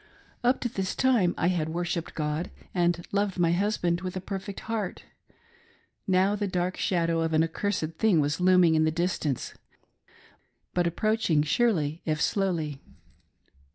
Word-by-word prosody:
Up 250 +2 +3
to - - 0
this 195 -5 -3
time 240 -10 +3
I 175 - +2
had 165 -4 0
worshipped 170 0 -3
God 150 +2 -2 0.2
and 175 -1 +1
loved 200 -1 0
my 170 -2 +3
hushand 175 -2 0
with 185 0 -4
a - - -1
perfect 195 +1 -6
heart. 220 -4 -4 1.0
Now 190 +2 +3
the 205 -1 -2
dark 180 0 -1
shadow 170 -2 0
of 165 0 -1
an 155 +1 +4
accursed 165 -1 -2
thing 210 -7 +4
was 150 +3 0
looming 180 -2 +5
in 155 0 +3
the 155 - +3
distance, 160 -5 -2 1.2
but 175 -1 +2
approach 215 +6 0
ing 150 -3 +4
surely 160 -4 +1
if 155 -1 -1
slowly. 160 -6 -1
175 Hz, 155 wpm, -27 LUFS, 160-195 Hz, 1.2 s, looming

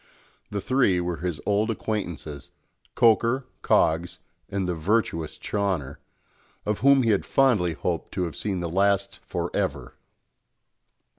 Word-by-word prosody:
The 100 -1 -3
three 115 -5 +2
were 90 -1 -2
his 85 0 -3
old 105 +2 +1
acquaintances, 85 - -4 0.5
Coker, 115 +3 +3 0.2
Coggs, 85 +2 +2 0.3
and 100 -2 -2
the 90 - 0
virtuous 85 -2 -1
Chawner 95 -10 -2 0.7
of 105 0 -1
whom 140 -1 +5
he 115 - +3
had 100 - +2
fondly 110 -11 +3
hoped - - -3
to 90 - -1
have 85 -4 -4
seen 95 +2 -2
the 85 - -2
last 100 +1 +1
for - - -4
ever! - - -2
100 Hz, 135 wpm, -25 LUFS, 85-110 Hz, 0.7 s, whom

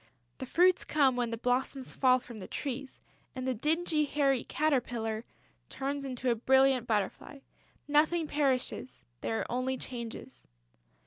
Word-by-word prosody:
The 260 - -5
fruits 360 +6 +4
come 275 -4 +3
when 245 -1 0
the 230 - -3
blossoms 255 +2 -1
fall 255 -1 +5
from 240 -3 -10
the 185 - -8
trees; 275 -1 -5 0.4
and 255 0 -4
the 260 - +1
dingy, 310 +4 +1
hairy 275 -3 +1
caterpillar 240 -7 -1 0.4
turns 275 +1 -3
into 255 -1 -1
a - - +2
brilliant 265 +1 +3
butterfly. 220 +6 -2 0.5
Nothing 310 +3 +3
perishes... 270 -3 -1 0.2
there 225 - -1
are - - -6
only 255 +2 -1
changes.... 240 0 -7
260 Hz, 140 wpm, -31 LUFS, 245-285 Hz, 0.5 s, fall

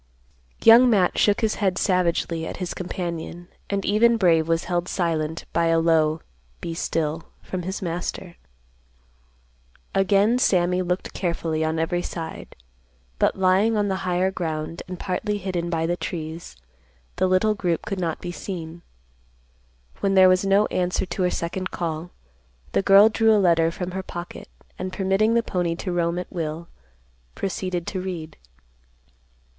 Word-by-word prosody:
Young 235 +3 +8
Matt 195 -6 +2
shook 205 +2 +3
his 220 -1 +1
head 190 -3 +1
savagely 170 -4 0
at - - -6
his 180 -2 -4
companion, 175 -1 -5 0.2
and 200 -1 -1
even 230 +3 +4
Brave 165 -6 +3
was 165 0 +1
held 175 0 -1
silent 160 -3 -2
by 170 0 +2
a 165 0 +3
low 160 -1 +2 0.4
"Be 165 - -5
still" 160 -1 -2 0.2
from 185 - -4
his 190 +3 -5
master. 175 +1 -4 1.6
Again 200 +5 +3
Sammy 180 -5 +2
looked 180 +1 -3
carefully 165 -3 -1
on 160 +1 -1
every 165 +2 0
side, 165 -2 -7 0.6
but - - +2
lying 190 +4 +3
on 205 -1 +1
the 190 - 0
higher 185 +1 +1
ground, 160 -2 -4
and 180 -1 -7
partly 205 +2 -2
hidden 180 -3 -3
by 165 -1 0
the 175 +1 0
trees, 160 - -6 0.6
the 185 - +2
little 185 +4 +3
group 180 -5 -2
could 195 -2 -3
not 165 -3 -2
be 175 - -5
seen. 170 -2 -7 1.2
When 195 -1 +1
there 185 -1 +7
was 185 +1 +3
no 195 +2 +4
answer 180 +1 0
to 185 - -4
her 180 - +3
second 185 +2 -3
call, 165 0 -4 0.6
the - - +2
girl 195 +2 +7
drew 220 0 +3
a - - +4
letter 170 -4 +3
from 180 +2 -5
her 190 +1 -3
pocket, 175 -1 -8 0.3
and, 185 - -4
permitting 195 +4 +1
the 235 - +3
pony 175 -5 -1
to 180 +2 -4
roam 170 0 0
at 180 - -6
will, 165 -1 -4 0.7
proceeded 185 -2 -3
to 185 - -3
read. 175 -4 -6
180 Hz, 155 wpm, -24 LUFS, 165-195 Hz, 1.6 s, Young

